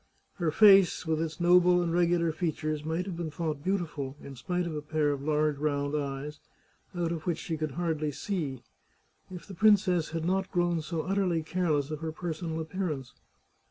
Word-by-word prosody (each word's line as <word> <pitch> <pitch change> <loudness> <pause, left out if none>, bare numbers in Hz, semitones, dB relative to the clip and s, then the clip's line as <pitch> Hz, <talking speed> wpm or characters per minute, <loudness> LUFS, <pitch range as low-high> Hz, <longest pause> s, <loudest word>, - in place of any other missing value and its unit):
Her 170 -4 0
face, 195 +1 +6
with 160 -1 0
its 160 0 -4
noble 180 +1 +5
and 170 -1 0
regular 170 -1 +2
features, 155 -2 -2
might 160 +3 -2
have 190 -3 -5
been 170 -1 -4
thought 155 -3 -4
beautiful, 160 -8 -2
in 140 - -10
spite 180 +7 -2
of 165 -2 -4
a 150 - -3
pair 150 -1 0
of 140 -1 -3
large 150 0 +1
round 145 -1 -1
eyes, 145 +1 -4 0.6
out 170 -1 -1
of 165 -1 -5
which 170 -3 +1
she 165 - -4
could 155 -3 -3
hardly 155 -2 -1
see, 145 - -4 0.7
if 180 -3 -9
the 200 - -10
princess 190 -4 +3
had 165 0 -3
not 190 +2 0
grown 175 -2 +1
so 160 0 -3
utterly 185 -4 0
care 175 +2 -1
less 145 -1 +1
of 155 - -4
her 160 0 -4
personal 160 0 -4
appearance. 160 -5 -4
165 Hz, 190 wpm, -29 LUFS, 150-175 Hz, 0.7 s, face